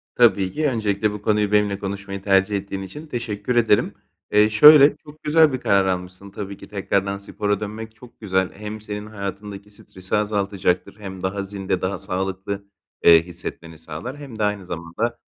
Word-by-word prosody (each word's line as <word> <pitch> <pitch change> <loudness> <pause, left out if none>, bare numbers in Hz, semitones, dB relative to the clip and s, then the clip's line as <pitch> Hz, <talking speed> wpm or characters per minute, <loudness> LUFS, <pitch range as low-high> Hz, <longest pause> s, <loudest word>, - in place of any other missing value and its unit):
Tabii 100 -6 +4
ki. 155 0 0
Öncelikle 105 -3 0
bu 105 -1 -7
konuyu 105 -1 +1
benimle 105 -1 +2
konuşmayı 100 0 -5
tercih 95 +1 +2
ettiğin 100 0 -4
için 150 +11 -9
teşekkür 120 -2 -3
ederim. 115 -3 +3 0.4
Eee, 105 +1 +5
şöyle, 145 +6 +8
çok 150 +1 -16
güzel 155 -2 +4
bir 130 - -2
karar 100 -1 +3
almışsın. 90 +1 -4
Tabii 100 -1 -6
ki - - -12
tekrardan 100 -1 -1
spora 105 0 -2
dönmek 110 +1 -7
çok 120 +1 -16
güzel. 95 -3 0
Hem 105 +1 -7
senin 105 0 -6
hayatındaki 100 0 -7
stresi 95 -2 -6
azaltacaktır, 100 -3 -1
hem 95 -2 -8
daha 100 +1 -2
zinde, 95 -2 -3
daha 95 0 -1
sağlıklı, 95 +2 -3 0.4
eee, 85 -1 +8
hissetmeni 85 -2 -8
sağlar 80 - -7
hem 135 -7 -10
de - - +1
aynı 105 -2 -1
zamanda, 85 +9 -3
100 Hz, 170 wpm, -22 LUFS, 95-110 Hz, 0.4 s, şöyle